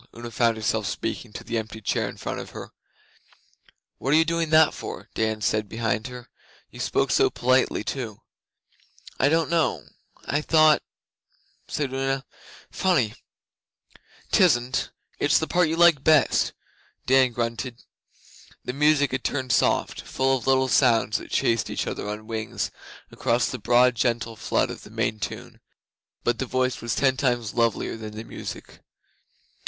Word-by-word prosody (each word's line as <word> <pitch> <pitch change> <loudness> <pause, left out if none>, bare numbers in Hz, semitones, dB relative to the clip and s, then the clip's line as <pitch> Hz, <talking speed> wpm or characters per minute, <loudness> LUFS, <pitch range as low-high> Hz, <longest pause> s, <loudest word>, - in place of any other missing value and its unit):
Una 120 0 -7
found 115 -1 +2
herself 110 -1 -1
speaking 110 +3 -4
to - - -8
the 115 -1 -2
empty 110 0 -7
chair 105 - -1
in - - -10
front - - -4
of - - -8
her. - - -9 1.3
'What 135 - 0
are - - +6
you 160 - +4
doing 165 -1 -1
that 155 0 +5
for?' - - -8
Dan 110 -1 -1
said 105 0 0
behind 110 -1 -1
her. 125 -1 -10 0.4
'You - - -12
spoke - - 0
so - - +4
politely 130 -2 +1
too.' 110 -3 -5 1.0
'I 140 - +4
don't 165 +1 +2
know... 165 -1 +1 0.4
I 145 - 0
thought 155 -1 +5 0.5
' - - -40
said 140 -3 -2
Una. 135 0 -1 0.5
'Funny!' 135 - +1 1.2
''Tisn't. 130 -8 +3 0.3
It's 145 - +4
the 160 - 0
part 175 0 +2
you 160 - 0
like 170 -5 +5
best,' 155 -3 +3 0.5
Dan 130 -1 +4
grunted. 115 +1 -4 0.8
The 125 - -3
music 145 0 +3
had 130 - -2
turned 130 -3 -2
soft - - +1
full 135 0 0
of 125 - -9
little 130 0 +3
sounds 115 -5 +3
that - - -11
chased 115 -2 +1
each - - -2
other 105 - -4
on 105 +1 -6
wings 110 -1 -3 0.4
across 120 +1 +1
the 125 - -5
broad 125 +3 +4
gentle 115 -1 -1
flood 105 - 0
of - - -9
the - - -13
main 110 - -2
tune. - - -6 0.6
But 120 - 0
the 130 - -2
voice 130 +1 -1
was 120 - -2
ten 130 -2 +2
times 120 -5 0
lovelier 115 -2 0
than 110 -1 -8
the 110 - -5
music. - - -8
125 Hz, 160 wpm, -25 LUFS, 115-140 Hz, 1.3 s, are